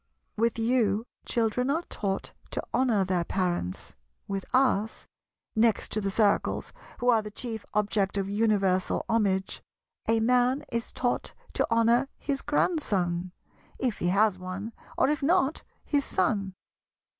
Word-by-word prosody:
With 230 +1 +1
you, 225 -2 +2 0.2
children 235 +2 +1
are 320 +5 +1
taught 195 - -3 0.2
to - - -3
honour 230 -7 +3
their 180 -2 +1
parents; 175 - -2 0.3
with 195 -1 -3
us—next 225 -2 0
to 215 - 0
the 195 - -1
Circles, 200 +1 +1 0.2
who 245 - +1
are 230 -2 +5
the 210 - -7
chief 220 0 -6
object 205 -1 +1
of 195 -1 0
universal 200 -3 +1
homage—a 210 +1 -1
man 250 +4 +3
is 235 -1 -2
taught 245 -1 -1 0.2
to - - +1
honour 230 +3 +3
his 275 -2 -2
Grandson, 190 - 0 0.5
if 245 -5 -1
he 175 - 0
has 200 +1 +3
one; 185 +5 -5 0.2
or, - - +4
if 300 +1 0
not, 320 0 +2 0.2
his 285 -2 +1
Son. 190 -1 0
220 Hz, 135 wpm, -28 LUFS, 195-245 Hz, 0.5 s, are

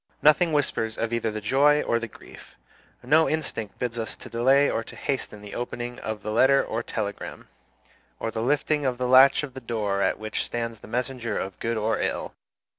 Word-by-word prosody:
Nothing 155 +3 +5
whispers 115 -7 0
of 115 0 -2
either 115 -1 0
the 110 0 -4
joy 145 +7 +4
or 115 - +1
the 115 - -4
grief. - - -15 0.5
No 155 +6 +4
instinct 145 -9 -3
bids 120 -1 -3
us 110 - -3
to - - -12
delay 135 +4 +4
or 115 - -1
to - - -12
hasten 105 -6 -3
the 105 - -9
opening 120 0 -5
of 110 -1 -5
the 110 - -3
letter 130 +5 +5
or - - -2
telegram, - - -5 0.7
or 115 - -2
the 110 - -3
lifting 145 +4 +1
of 130 -2 0
the 125 0 -1
latch 135 +3 +7
of 140 -4 -6
the 130 - -8
door 105 -4 -1
at - - +1
which 110 0 -3
stands 115 -2 -4
the - - -13
messenger 120 -1 -2
of 95 -1 -5
good 115 0 -1
or 110 +1 0
ill. - - -2
120 Hz, 200 wpm, -26 LUFS, 110-135 Hz, 0.7 s, latch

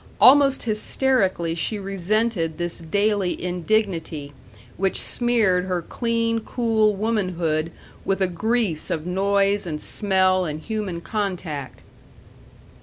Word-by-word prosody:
Almost 275 0 +6
hysterically 215 -6 +1
she 170 +6 -1
resented 195 -3 -1
this 175 0 -3
daily 200 +2 0
indignity, 175 -5 -1 0.4
which 195 +1 +1
smeared 220 -7 +1
her 180 -2 -2
clean, 230 +1 -1
cool 220 -2 +1
womanhood 180 -7 -1 0.3
with 195 - 0
a 190 - +3
grease 200 -2 -1
of 155 -1 -2
noise 200 +1 +1
and 155 -2 -3
smell 185 -1 +1
and 155 -3 -4
human 205 -3 -4
contact. 175 -10 -4
195 Hz, 110 wpm, -23 LUFS, 170-220 Hz, 0.4 s, Almost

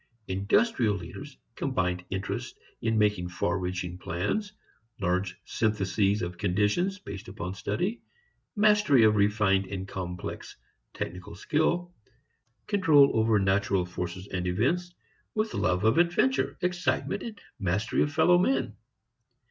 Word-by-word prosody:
Industrial 105 - +2
leaders 130 - -9 0.2
combine 90 -10 -1
interest 95 0 -4 0.2
in 115 -1 +1
making 105 -4 +1
far 85 +1 -1
reaching 90 -1 -4
plans, 200 - -2 0.5
large 95 0 -1
syntheses 105 -2 +1
of 90 0 -5
conditions 105 - +1
based 100 - -9
upon 95 -2 -5
study, 115 - -2 0.5
mastery 210 - +5
of 110 -1 +5
refined 100 -2 +2
and 95 -1 -5
complex 90 -2 -6 0.4
technical 90 0 -6
skill, 170 - 0 0.7
control 160 -9 +5
over 110 -1 +3
natural 95 -1 +1
forces 90 +1 -5
and 90 -1 -2
events, 155 - 0 0.4
with 215 0 0
love 90 +1 +1
of 110 +8 +4
adventure, 135 -6 +2
excitement 180 +2 -1
and 220 -3 -7 0.2
mastery 100 +3 0
of 145 - +1
fellow 160 +4 +4
men. 135 - +1
105 Hz, 120 wpm, -28 LUFS, 95-155 Hz, 0.7 s, mastery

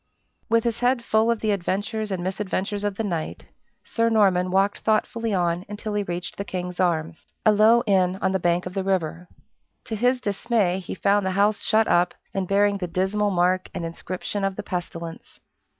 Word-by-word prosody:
With 230 0 +3
his 235 -1 -1
head 245 0 +2
full 220 0 +2
of 235 -2 0
the 215 - +1
adventures 205 +3 -2
and 185 -3 -3
misadventures 195 +1 -2
of 205 -1 -1
the 225 - -2
night, 170 -6 -4 0.4
Sir 230 0 0
Norman 190 -5 +3
walked 195 +2 +2
thoughtfully 225 +1 0
on 175 -2 0
until 210 +1 -5
he 205 - +1
reached 175 -2 -5
the 200 - -2
King's 180 -2 -5
Arms 165 -2 -1 0.2
a 215 - +7
low 220 +3 +5
inn 190 -3 +2
on 190 - +1
the 190 - 0
bank 175 0 +1
of 180 - -6
the 195 -1 -1
river. 180 -2 -1 0.6
To 225 - -4
his 250 +4 +2
dismay 205 -3 0
he 185 - -6
found 200 +2 +2
the 190 - 0
house 205 0 +3
shut 220 0 +3
up, 175 +1 +2 0.2
and 195 -2 -2
bearing 200 +1 +2
the 180 - -3
dismal 190 +4 0
mark 185 0 +1
and 170 - -3
inscription 185 +4 -5
of 195 -1 0
the - - -5
pestilence. 170 -2 -6
195 Hz, 195 wpm, -24 LUFS, 180-215 Hz, 0.6 s, a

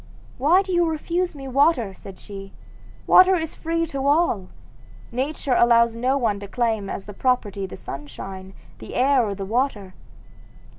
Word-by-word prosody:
'Why 340 +9 +4
do 385 - -6
you 345 -1 +3
refuse 340 +2 -2
me 270 -1 -8
water?' 265 -6 +2
said 190 0 -12
she; 195 -1 -10 0.5
'water 370 +1 +7
is 320 -3 -3
free 330 0 -1
to 275 -3 -3
all. 285 - +2 0.6
Nature 265 +2 -2
allows 235 -1 +4
no 255 +4 +1
one 220 -6 0
to 200 - -8
claim 220 -3 -1
as 195 - -5
property 205 -3 -1
the - - -9
sunshine, 190 +6 -8 0.2
the - - -9
air, 265 0 +3
or 205 -3 -2
the 195 0 -5
water. 215 -4 -1
245 Hz, 155 wpm, -23 LUFS, 200-300 Hz, 0.6 s, water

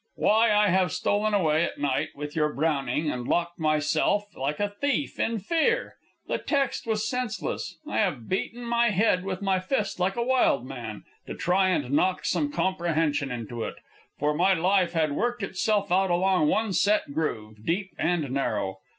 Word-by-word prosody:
"Why, 220 +2 +3
I 210 0 +4
have 185 0 +2
stolen 210 +1 +1
away, 160 -4 +2
at - - -3
night, 140 -2 0
with 145 +1 -6
your 150 -1 +1
Browning, 150 -1 0
and 125 -1 -5
locked 170 0 0
myself 155 +5 +1
in - - -12
like 145 +3 -1
a 205 - +1
thief 285 +7 -2
in 230 0 0
fear. 335 - 0 0.3
The - - -2
text 275 -5 -1
was 215 -1 0
senseless, 220 -7 -3
I 105 - -3
have 120 -3 -1
beaten 235 +5 -3
my 235 0 +2
head 195 -2 +2
with 190 0 -4
my 190 -1 +2
fist 205 +1 -2
like 185 +2 +1
a 235 - 0
wild 245 - +2
man, 120 -5 -7 0.2
to - - -5
try 185 +1 +2
and 140 -8 0
knock 185 +6 +1
some 290 -1 0
comprehension 165 - 0
into 120 -1 -5
it. - - -5 0.4
For 150 +1 +1
my 185 +5 +3
life 180 +1 +2
had 160 -3 +1
worked 240 +8 -1
itself 200 +1 0
out 190 +1 +3
along 180 -2 +2
one 215 +4 +1
set 200 -7 +2
groove, 110 -9 -3
deep 190 - -1
and 165 -2 +1
narrow. 105 -8 -1
180 Hz, 180 wpm, -26 LUFS, 150-210 Hz, 0.4 s, I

